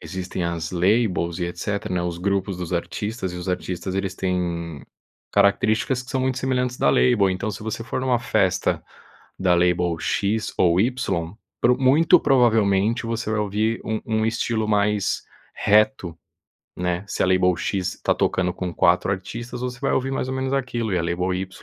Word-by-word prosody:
existem 95 -1 -5
as 85 -2 -3
labels 90 -2 +1
e 90 - 0
etc, 100 +4 -4
né, 90 -1 0
os 85 -1 -3
grupos 100 0 -1
dos 90 0 -5
artistas 95 +2 -3
e - - -6
os 90 +1 -6
artistas, 90 +1 -3
eles 95 -1 -2
têm 85 -5 -2 0.5
características 110 +5 +2
que 125 - -12
são 130 - 0
muito 130 0 0
semelhantes 125 -1 -1
da - - +3
label. 105 -7 +3
Então 110 +4 -2
se 105 - -7
você 110 +1 -4
for - - -3
numa 130 -2 +1
festa 120 - +1 0.6
da 90 -2 +3
label 90 -1 +2
"x" 105 +2 -1
ou 90 0 +4
"y", 120 +4 +2 0.7
pro 125 +1 +3
muito 160 +7 +5
provavelmente 115 -4 +3
você 115 -1 -3
vai 110 - 0
ouvir 105 +2 0
um 110 0 -2
um 110 -1 +1
estilo 115 -1 -1
mais 105 -1 +1 0.3
reto, 105 -5 +2 0.6
né, 90 +2 -2
se - - -1
a - - +2
label 90 -1 +3
"x" 95 -2 -2
tá - - +2
tocando 90 -1 0
com 90 -1 -4
4 90 +2 +3
artistas, 120 +6 -5
você 125 -1 -4
vai 140 - 0
ouvir 135 +1 0
mais 130 - -2
ou 130 - -2
menos 130 0 -2
aquilo 120 -6 -1
e - - +2
a - - -1
label 90 +2 -1
"y", 95 +1 -3
100 Hz, 180 wpm, -23 LUFS, 90-120 Hz, 0.7 s, muito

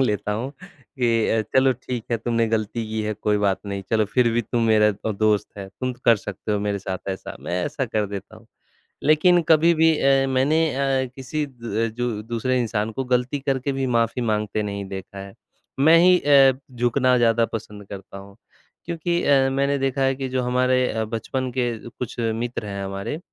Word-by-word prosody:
लेता 105 -4 0
हूँ 120 +6 -3
कि, 120 -4 -2
"अ, 110 -1 +2
चलो 130 0 +5
ठीक 125 -1 -6
है, 115 - +2
तुमने 115 0 0
गलती 110 +1 -2
की 110 0 -2
है 105 0 -2
कोई 105 0 0
बात 100 -2 +1
नहीं, 100 -1 -4
चलो 110 -1 +3
फिर 120 +4 +2
भी 120 +1 +1
तुम 115 +1 -1
मेरा 110 -1 +5 0.2
अ, 110 - 0
दोस्त 105 0 +1
है, 100 -1 -7
तुम 130 +6 -4
तो 120 - -18
कर 115 -2 +6
सकते 100 +1 -5
हो 105 - +1
मेरे 100 -1 -1
साथ 95 0 -6
ऐसा।" 95 -1 -5
मैं 90 +1 -2
ऐसा 145 -2 -2
कर 110 -2 -1
देता 100 +2 -8
हूँ। 110 +1 -18 0.6
लेकिन 155 +4 +4
कभी 165 +1 +5
भी 160 +1 +4
अ, 135 0 +3
मैंने 135 +5 +2
अ, 135 -1 +1
किसी 140 +3 -3
द 115 -3 -3
जो 120 0 -1
दूसरे 120 +3 -1
इंसान 110 -2 -1
को 135 +4 -3
गलती 125 +2 0
करके 135 0 -1
भी 135 -1 -1
माफ़ी 115 +2 0
माँगते 105 -1 -1
नहीं 100 -1 -4
देखा 95 +1 -8
है, 95 0 -9 0.4
मैं 160 +4 +6
ही 180 +1 +6
अ, 140 -2 +6 0.2
झुकना 125 +1 +2
ज़्यादा 115 -1 +3
पसंद 105 -2 -7
करता 100 0 -9
हूँ, 100 +1 -13 0.5
क्योंकि 170 +1 -1
अ, 135 -2 +4
मैंने 140 +1 +1
देखा 135 0 -1
है 135 0 +2
कि 135 0 -4
जो 130 0 -1
हमारे 125 +1 +2
अ, 110 0 -2
बचपन 120 +4 -3
के 125 -1 +2 0.2
कुछ 120 0 -7
मित्र 115 0 -2
हैं 100 -1 -5
हमारे, 95 +9 -4
120 Hz, 200 wpm, -23 LUFS, 105-135 Hz, 0.6 s, कर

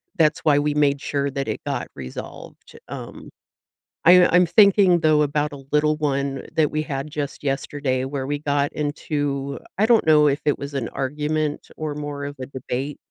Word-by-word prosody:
that's 160 -4 +3
why 150 -2 +3
we 150 0 0
made 145 -1 +2
sure 140 -1 -1
that 135 0 -3
it - - -3
got - - -3
resolved. 65 -2 -9
Um, - - -9 0.8
I'm 180 +2 +8
I'm 180 0 +5
thinking, 190 0 +5
though, 155 -2 +3
about 150 +1 -1
a 140 -1 -10
little 150 +1 +3
one 140 -2 -2
that 155 -2 +2
we 155 - -1
had 140 -1 -4
just 145 -1 -5
yesterday 135 -1 -1
where 135 0 -4
we 145 0 -2
got 145 -1 0
into 145 -2 -3 0.2
I 205 - +3
don't 235 -1 +4
know 150 -1 +5
if 140 0 0
it 145 - +2
was 140 +1 -6
an 125 -4 -2
argument 150 +2 -2
or 155 -2 -4
more 145 -1 -5
of 145 0 -6
a 130 - -4
debate, 135 +1 -5
145 Hz, 185 wpm, -22 LUFS, 140-155 Hz, 0.8 s, I'm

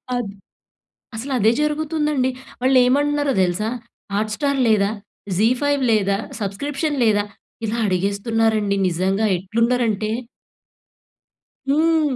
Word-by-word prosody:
అద్ 245 -4 -2 0.9
అసల 235 +6 -5
అదే 215 +2 +5
జరుగుతుందండి. 300 -3 0 0.3
వాళ్ళు 260 +1 +3
ఏమంటున్నారో 290 +2 +2
తెలుసా! 185 +4 0 0.5
హాట్ 215 +1 0
స్టార్ 280 -2 0
లేదా? 205 -2 +3 0.5
జీ 215 +4 +4
ఫైవ్ 285 -1 +1
లేదా? 200 -2 +2 0.2
సబ్స్క్రిప్షన్ 280 - -2
లేదా? 205 -2 +3 0.4
ఇలా 225 +2 -2
అడిగేస్తున్నారండి. 205 +2 +1
నిజంగా 190 +4 0
ఎట్లున్నరంటే. 220 +2 0 1.6
హ్మ్. 310 -1 +2
225 Hz, 100 wpm, -21 LUFS, 205-285 Hz, 1.6 s, అదే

